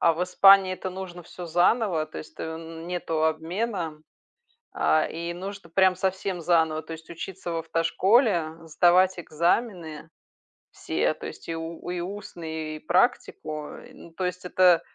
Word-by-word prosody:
а 165 - +5
в 165 - -2
Испании 190 +1 +6
это 185 - -5
нужно 180 -1 -7
всё 175 +1 -9
заново. 175 -1 +2
То 80 - -8
есть 80 0 -11
нету 165 0 -3
обмена, 165 +1 -2 0.7
а, 80 0 +3
и 170 +1 -4
нужно 195 -1 -8
прям 185 +1 +4
совсем 190 -1 -2
заново, 160 -2 +2
то 160 +1 -9
есть 160 0 -10
учиться 175 +1 -6
в - - -2
автошколе, 170 - +2 0.2
сдавать 180 +3 +4
экзамены 170 -1 -1 0.6
все, - - -1
то - - -8
есть - - -10
и 165 - -2
у 165 +1 -6
и 180 0 -2
устный, 165 -5 -6
и - - -12
практику. 155 -4 0
Э, - - -12
ну, 170 - -14
то 185 +3 -3
есть 180 +1 -3
это 180 -2 +5
170 Hz, 155 wpm, -26 LUFS, 160-185 Hz, 0.7 s, Испании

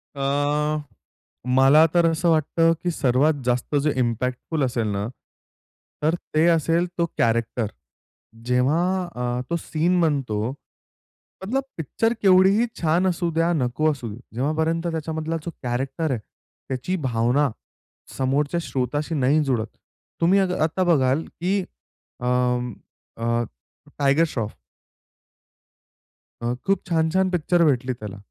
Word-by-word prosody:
अ, 145 +2 0 0.8
मला 140 +4 +7
तर 175 -1 +4
असं 165 +2 +1
वाटतं 165 +1 +3
की 175 - +1
सर्वात 140 0 +2
जास्त 125 +3 0
जे 150 - +2
इम्पॅक्टफुल 125 +5 -1
असेल 120 -3 0
ना, 100 0 -2 1.0
तर 160 +3 +3 0.2
ते 155 +2 +4
असेल 165 +1 +3
तो 170 - +2
कॅरेक्टर. 115 0 +1 0.8
जेव्हा 125 +6 +2 0.3
अ, 125 0 -2
तो 170 - 0
सीन 170 +3 0
बनतो, 125 -9 0 1.0
मतलब 265 +7 0
पिक्चर 225 - 0
केवढीही 195 +3 +5 0.2
छान 170 +3 +2
असू 175 -1 0
द्या, 165 +1 +1
नको 155 +2 +1
असू 130 -5 -6
द्या, 105 +3 -8 0.2
जेव्हापर्यंत 160 +6 0
त्याच्यामधला 160 0 -3
जो 170 - -3
कॅरेक्टर 135 +6 -2
आहे, 125 - -1 0.5
त्याची 130 +8 -2
भावना 125 +5 +2 0.7
समोरच्या 140 +5 0
श्रोत्याशी 145 +5 -2
नाही 140 +2 +3
जुळत. 120 -6 0 0.5
तुम्ही 180 +4 +4
आ 195 - +3 0.2
आता 165 +4 0
बघाल 145 -4 +2 0.2
की 190 +3 +1 0.6
अ, 125 - -5 0.9
अ, 115 +1 0 0.6
टायगर 140 +3 +4
श्रॉफ. 115 -8 -4 1.8
अ, 120 +1 -1
खूप 195 -1 +2
छान-छान 170 +3 +2
पिक्चर 175 0 +2
भेटली 130 -3 +1
त्याला. 105 -4 -8
150 Hz, 120 wpm, -23 LUFS, 125-165 Hz, 1.8 s, मला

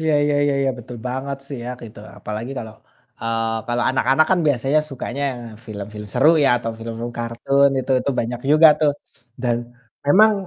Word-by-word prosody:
Iya 160 -1 +1
iya 145 - +1
iya 145 - +2
iya, 135 -1 +2
betul 120 0 -9
banget 130 +2 -3
sih 140 - -6
ya 125 - -4
gitu. 110 -2 -11 0.2
Apalagi 110 +4 -5
kalau, 110 -1 -7 0.5
eee, 115 0 -1
kalau 120 0 0
anak-anak 135 +3 +3
kan 185 - +4
biasanya 140 +2 +2
sukanya 135 0 -5 0.4
film-film 105 0 -7
seru 130 +10 +4
ya - - +5
atau 115 -1 -3
film-film 115 +1 -5
kartun 135 +4 +2
itu 130 +1 -7
itu 140 - -1
banyak 120 +1 -4
juga 155 +2 +8
tuh, 150 -2 +4 0.5
dan 120 -2 +1 0.5
memang 215 +9 +6
125 Hz, 170 wpm, -21 LUFS, 115-140 Hz, 0.5 s, juga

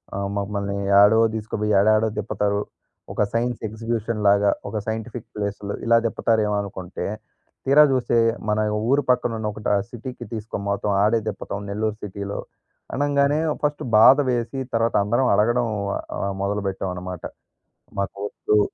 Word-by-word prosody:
ఆహ్, 100 0 -2
మమ్మల్ని 100 0 -2 0.3
ఏడో 105 +2 +6 0.2
తీసుకుపోయి 105 -1 -2
ఏడాడో 110 +2 +4
తిప్పుతారు 100 -1 0 0.5
ఒక - - +1
సైన్స్ 120 +1 0
ఎగ్జిక్యూషన్ 115 0 -3
లాగా, 100 0 +5 0.2
ఒక 110 - -4
సైంటిఫిక్ 110 +1 -4
ప్లేస్‌లో 100 -1 -3
ఇలా 115 0 +5
తిప్పుతారేమో 110 -1 +1
అనుకుంటే, 95 -2 -6 0.6
తీరా 140 +3 +7
చూస్తే 125 -2 +1 0.3
మన 105 - +2 0.3
ఊరు 140 +2 +3
పక్కన 120 -2 +2
ఉన్న 110 - -2
ఒకటి 105 - -3
ఆహ్, 100 - +1
సిటీకి 120 0 -7
తీసుకునిపోటం 105 -2 -2
ఆడే 110 +2 +3
తిప్పటం 100 -1 -5
నెల్లూరు 105 +1 -2
సిటీలో. 100 0 -5 0.6
అనంగానే 145 +1 +2 0.2
ఫస్ట్ 145 0 0
బాధ 130 +6 +8
వేసి 120 +2 -2 0.2
తర్వాత 115 0 +1
అందరం 120 +5 +2
అడగడం 120 +3 +2 0.5
ఆహ్, 100 0 -1
మొదలుపెట్టాం 100 -1 -2
అన్నమాట. 90 -1 -7 0.8
మాకొద్దు. 100 +2 -1
110 Hz, 130 wpm, -23 LUFS, 100-120 Hz, 0.8 s, బాధ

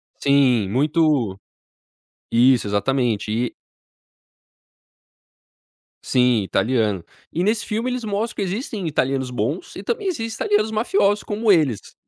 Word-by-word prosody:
Sim, 130 -7 +3
muito 145 - +1 0.9
Isso, 125 -1 +4
exatamente, 110 +1 0
e 120 +2 -1 2.5
Sim, 125 -4 +2
italiano. 105 -2 0 0.3
E 175 - 0
nesse 215 +2 0
filme 225 +3 -2
eles 250 -1 -3
mostram 215 +2 -2
que - - -2
existem 200 - -4
italianos 135 -3 -1
bons 125 - -3
e - - -7
também 445 -4 -2
existe 225 -10 -3
italianos 215 +1 +1
mafiosos 215 - +1
como 215 +1 +1
eles. 145 - +1
145 Hz, 115 wpm, -21 LUFS, -, 2.5 s, Isso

